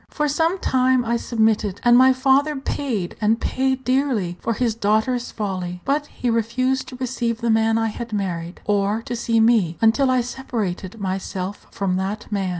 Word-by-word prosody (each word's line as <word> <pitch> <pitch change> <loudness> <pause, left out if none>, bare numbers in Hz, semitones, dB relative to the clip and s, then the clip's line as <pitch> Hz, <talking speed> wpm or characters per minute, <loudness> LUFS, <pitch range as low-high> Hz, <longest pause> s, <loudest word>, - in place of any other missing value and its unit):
For 300 - -1
some 325 +5 +1
time 255 -6 +2
I 235 +1 +1
submitted, 220 -4 0
and 240 0 +6
my 260 +1 +7
father 270 +3 +2
paid, 260 -8 -3
and 220 +2 +2
paid 260 +1 -1
dearly, 255 -9 0
for 230 - -1
his 230 0 0
daughter's 220 +3 0
folly; 185 -4 -4
but 290 +2 0
he 245 -4 -2
refused 255 +4 0
to 255 - -9
receive 245 -2 -2
the 235 -1 +1
man 225 0 +3
I 225 0 +1
had 235 +2 -7
married, 180 -4 -3
or 205 +2 0
to 240 - -4
see 230 -1 +1
me 220 -7 +3
until 225 +5 +3
I 255 -1 +3
separated 225 -6 -4
myself 190 0 -4
from 195 -4 -1
that 200 +4 -4
man. 195 -2 -1
230 Hz, 175 wpm, -22 LUFS, 205-255 Hz, -, my